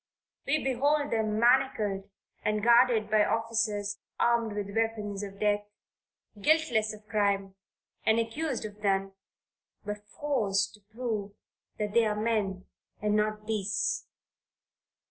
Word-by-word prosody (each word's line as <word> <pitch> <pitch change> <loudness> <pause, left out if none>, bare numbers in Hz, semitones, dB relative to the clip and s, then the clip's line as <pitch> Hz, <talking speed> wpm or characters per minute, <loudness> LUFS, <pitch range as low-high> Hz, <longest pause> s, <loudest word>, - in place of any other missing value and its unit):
We 305 +3 +1
behold 285 +3 +1
them 215 -2 0
manacled 225 -6 +2 0.3
and 210 0 0
guarded 235 -2 +5
by 215 -1 +5
officers 215 -2 0 0.2
armed 235 -2 +2
with 200 0 -4
weapons 215 -3 -1
of 200 -1 -7
death 205 0 +1 0.8
guiltless 265 -7 +3
of 215 0 -12
crime 200 -2 +1 0.5
and 220 - +3
accused 240 +3 -2
of 210 0 -9
none, 195 -1 +1 0.7
but 210 0 -6
forced 220 -9 0
to 210 - -15
prove 210 -1 -4 0.4
that 210 -1 -2
they 230 -1 +4
are 210 - 0
men 210 -4 -1 0.3
and 210 0 +1
not 215 0 0
beasts. 210 -2 -1
215 Hz, 125 wpm, -29 LUFS, 205-230 Hz, 0.8 s, guarded